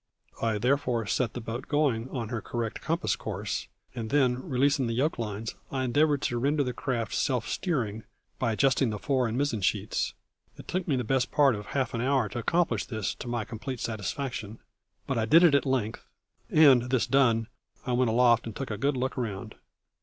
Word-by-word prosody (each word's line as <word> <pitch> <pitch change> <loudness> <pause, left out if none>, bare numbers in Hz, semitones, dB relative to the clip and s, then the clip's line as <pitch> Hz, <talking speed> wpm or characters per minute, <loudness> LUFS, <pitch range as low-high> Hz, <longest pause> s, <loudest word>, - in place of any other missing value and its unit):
I 110 -2 +1
therefore 125 -1 +1
set 115 +2 0
the - - -3
boat 115 +3 -5
going 135 -5 +1
on 115 -4 -4
her 120 -2 -3
correct 115 0 -4
compass 165 +3 0
course, 105 -1 -4 0.3
and 115 -3 -5
then, 130 -2 +2
releasing 135 0 +2
the 115 - -2
yoke 140 +4 0
lines, 110 0 -4 0.2
I 130 -1 -1
endeavoured 145 +3 +2
to 120 - 0
render 145 +3 +2
the 125 -2 -3
craft 120 -4 -2
self 125 -3 0
steering 115 - -2 0.3
by 115 -3 +1
adjusting 135 +1 +2
the 105 - -3
fore 130 +2 +1
and 115 +2 -3
mizen 135 -6 0
sheets. 100 +2 0 0.4
It - - -12
took 185 0 -2
me 145 - +2
the 125 - -1
best 130 +2 0
part 140 -3 +4
of 105 -1 -6
half 135 -4 -1
an 115 - -1
hour 130 -4 +1
to 120 - -4
accomplish 170 +8 +1
this 110 -5 -3
to - - -9
my 120 -2 -2
complete 120 +3 -6
satisfaction, 110 0 -4 0.5
but 135 -4 -1
I 110 - +1
did 165 +9 +6
it 170 -5 +6
at 140 0 +3
length 120 -5 -1 0.5
and, 135 -6 +6
this 125 -6 +2
done, 115 -4 +3 0.4
I 125 - -2
went 125 -1 +2
aloft 120 0 +4
and 115 - -7
took 135 -4 -4
a 105 - -4
good 140 -1 +1
look 130 +1 -1
round. 105 -6 -4
125 Hz, 200 wpm, -28 LUFS, 115-135 Hz, 0.5 s, did